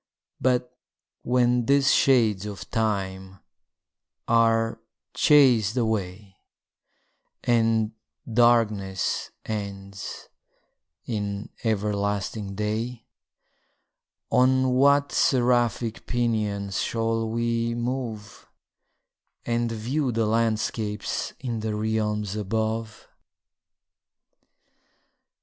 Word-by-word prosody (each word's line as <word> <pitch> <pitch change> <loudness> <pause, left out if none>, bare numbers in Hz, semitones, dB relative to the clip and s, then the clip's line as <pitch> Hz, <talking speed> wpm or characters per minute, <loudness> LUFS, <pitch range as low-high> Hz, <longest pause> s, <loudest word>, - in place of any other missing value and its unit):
But 125 -1 0 0.5
when 125 -1 +2
these 140 0 +4
shades 110 -7 +3
of 100 -2 -8
time 95 -3 -2 0.9
are 115 0 +2 0.3
chas'd 125 -7 +4
away, 100 -4 -2 1.1
And 115 -2 +2 0.4
darkness 110 -5 +2 0.2
ends 100 -2 -6 0.8
in 105 -2 -3
everlasting 100 -1 -1
day, 110 +3 -3 1.3
On 130 +1 +4
what 140 +2 +4
seraphic 120 -3 +1
pinions 105 -5 -1
shall 115 0 -1
we 115 0 -1
move, 120 -4 -5 1.0
And 120 0 0
view 125 +5 -1
the 115 -1 0
landscapes 110 -1 -1
in 120 -4 -3
the 110 -1 -2
realms 105 -1 -1
above? 110 +1 -3
115 Hz, 70 wpm, -25 LUFS, 105-120 Hz, 1.3 s, these